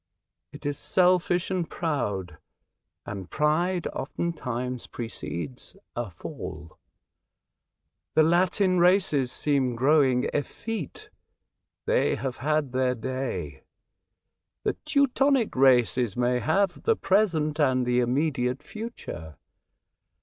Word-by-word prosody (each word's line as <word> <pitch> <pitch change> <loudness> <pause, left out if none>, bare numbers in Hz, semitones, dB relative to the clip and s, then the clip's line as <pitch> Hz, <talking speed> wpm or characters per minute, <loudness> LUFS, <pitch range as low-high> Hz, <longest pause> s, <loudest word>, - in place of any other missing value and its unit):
It - - -12
is 145 -1 -2
selfish 180 0 +2
and 180 -3 -1
proud, 100 - -2 0.7
and 95 -4 -6
pride 170 +4 +1
oftentimes 125 -5 -3
precedes 115 - -6 0.2
a 120 -3 -3
fall. 80 -2 -8 1.4
The 155 - +6
Latin 180 +3 +3
races 175 -8 +3
seem 135 -5 +1
growing 130 -1 +3
effete. 195 - -4 0.7
They - - +2
have 135 -2 -4
had 150 -1 0
their 130 0 +1
day. 115 - -4 1.0
The - - +1
Teu 285 -2 +4
tonic 270 -2 +2
races 125 -4 +3
may 125 0 +2
have 190 - +1
the 455 - +2
present 170 - +1
and 130 -4 +3
the 125 0 +2
immediate 130 +1 0
future. 150 - -7
140 Hz, 100 wpm, -26 LUFS, 125-175 Hz, 1.4 s, The